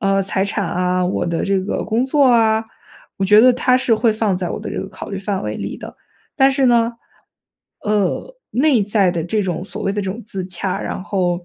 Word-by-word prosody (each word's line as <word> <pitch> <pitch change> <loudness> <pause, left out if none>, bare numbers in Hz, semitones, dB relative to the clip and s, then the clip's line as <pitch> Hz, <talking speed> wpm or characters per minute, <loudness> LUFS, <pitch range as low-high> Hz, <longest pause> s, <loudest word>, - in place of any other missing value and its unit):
呃， 195 -2 +2
财 195 0 -1
产 200 -1 -2
啊， 180 0 0
我 185 - -1
的 170 -1 -1
这 195 -1 +1
个 190 - -3
工 230 +3 0
作 280 +1 +3
啊， 225 -2 +3 0.5
我 195 - +1
觉 210 +2 +6
得 250 +2 +6
它 250 +1 +2
是 255 -3 +2
会 220 0 +2
放 215 -4 0
在 180 -1 -3
我 - - -3
的 - - -6
这 - - -4
个 - - -8
考 - - -9
虑 195 - -4
范 195 0 -3
围 - - -3
里 - - -5
的。 - - -10 0.4
但 270 -1 +4
是 270 -1 +2
呢， 235 -1 +3 0.9
呃， 210 - -1 0.2
内 260 -4 +3
在 200 -3 +2
的 165 -2 -2
这 210 +6 -1
种 180 -3 -2
所 195 - -8
谓 195 - 0
的 205 0 -2
这 190 - -3
种 225 +5 -6
自 195 -3 -5
洽， 185 +1 -3
然 - - -4
后， 180 -3 -1
205 Hz, 245 characters per minute, -19 LUFS, 190-230 Hz, 0.9 s, 觉